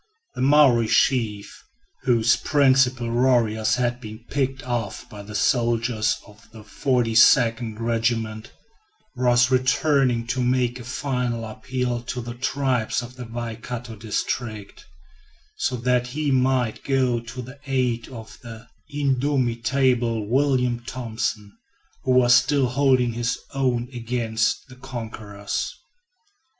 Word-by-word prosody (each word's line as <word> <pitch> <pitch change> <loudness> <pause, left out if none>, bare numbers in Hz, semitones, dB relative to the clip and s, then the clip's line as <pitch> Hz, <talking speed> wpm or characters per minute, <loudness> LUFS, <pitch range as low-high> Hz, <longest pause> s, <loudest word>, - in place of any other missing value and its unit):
The - - -5
Maori 130 -4 +5
chief, 110 -5 0 0.4
whose 115 -2 +3
principal 130 -4 +2
warriors 120 -3 +2
had 120 0 -1
been 110 0 -10
picked 135 -1 -1
off 120 -6 -4
by 105 - -9
the 105 +1 -9
soldiers 115 0 +1
of 105 +1 -18
the 110 -1 -12
42nd 115 -1 +3
Regiment, 115 -1 -1 0.6
was 125 0 +3
returning 130 -1 +2
to 125 +2 -2
make 125 0 +1
a - - -8
final 125 -2 -2
appeal 120 +2 -3
to 125 +1 -5
the 120 0 -6
tribes 130 -2 -1
of 120 +1 -10
the 125 -1 -8
Waikato 115 0 -6
district, 110 0 -4 0.7
so 130 - -1
that 125 0 0
he 145 +3 -2
might 130 -3 +1
go 130 -3 +1
to 120 +2 -8
the 130 +3 -12
aid 125 -3 0
of 110 -4 -11
the 115 -2 -11 0.2
indomitable 130 -4 0
William 125 -1 +1
Thompson, 110 -4 -4 0.5
who 130 - +3
was 125 -1 +5
still 130 +2 +4
holding 130 -2 +2
his 120 +1 -1 0.2
own 125 -3 0
against 115 -2 -1
the 130 -1 -14
conquerors. 110 -5 -5
120 Hz, 120 wpm, -23 LUFS, 115-130 Hz, 0.7 s, Maori